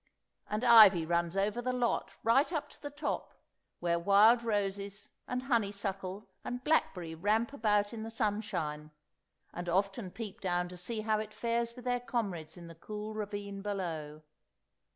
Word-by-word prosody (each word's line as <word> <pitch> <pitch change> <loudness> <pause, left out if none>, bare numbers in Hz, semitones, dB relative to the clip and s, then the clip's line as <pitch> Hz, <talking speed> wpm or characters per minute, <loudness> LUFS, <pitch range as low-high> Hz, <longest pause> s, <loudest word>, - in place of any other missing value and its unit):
And 210 +3 -2
ivy 215 -8 +8
runs 170 +2 0
over 205 +4 +1
the 255 +1 -1
lot 240 -5 -1
right 270 +8 +4
up 300 -3 -2
to - - -17
the 290 - -5
top, 290 +1 -4 0.4
where 170 -1 +1
wild 205 +6 +6
roses 200 -2 -2 0.2
and 250 0 -2
honeysuckle 200 -5 -2 0.2
and 245 +1 -5
blackberry 180 - +1
ramp 215 - +1
about 210 -4 +1
in 225 - -5
the 225 - -5
sunshine, 205 -9 -2 0.6
and 175 0 -4
often 195 +3 0
peep 220 +2 -7
down 180 -1 0
to 180 - -9
see 215 +5 -4
how 215 0 +1
it 215 0 -6
fares 235 0 -1
with 250 -1 -11
their 245 0 +1
comrades 195 -10 -3
in 175 - -10
the 165 - -10
cool 210 +6 -6
ravine 205 -2 -5
below. 165 -7 -4
205 Hz, 160 wpm, -32 LUFS, 185-230 Hz, 0.6 s, ivy